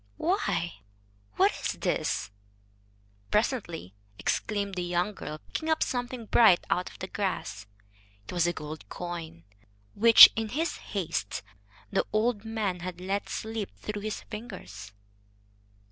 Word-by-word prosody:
"Why, 175 - 0 0.6
what - - +4
is - - -1
this?" 100 0 -1 1.0
presently 200 - -1 0.2
exclaimed 200 - -1
the 180 - -2
young 175 +3 0
girl, 155 -5 -6
picking 315 - -4
up 315 - +3
something 245 -1 -3
bright 215 -5 +5
out 180 - +1
of - - -14
the 190 - -5
grass. 120 - -3 0.6
It - - -6
was 175 -1 +2
a - - +2
gold 155 0 -8
coin, 170 - -6 0.5
which, 230 +2 +11
in 225 -1 -2
his 320 +8 -1
haste, 165 - -3 0.5
the - - +1
old 215 0 +1
man 215 -5 -2
had 180 0 -6
let 195 +2 -2
slip 220 -2 -4
through 210 -1 -5
his 215 0 -4
fingers. 145 - -9
195 Hz, 130 wpm, -28 LUFS, 170-220 Hz, 1.0 s, which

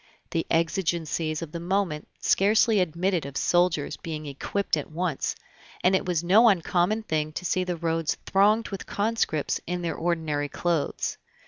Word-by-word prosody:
The 165 - -1
exigencies 165 -2 0
of 160 - -8
the 170 - -5
moment 175 -3 -1
scarcely 215 +2 +3
admitted 180 0 0
of 140 0 -6
soldiers 175 -4 +1
being 155 -2 -6
equipped 150 +8 -2
at 150 - -4
once, 165 -2 -2 0.5
and 185 +1 +5
it 190 - -1
was 175 -2 0
no 215 +7 +6
uncommon 190 +3 +1
thing 155 -5 -1
to 180 - -5
see 185 +1 +1
the 180 -1 -3
roads 165 -1 -1
thronged 210 +3 +3
with 195 -2 -6
conscripts 205 -8 0
in 175 0 -2
their 170 - -1
ordinary 160 -4 -1
clothes. 170 -3 -1
175 Hz, 155 wpm, -26 LUFS, 160-190 Hz, 0.5 s, no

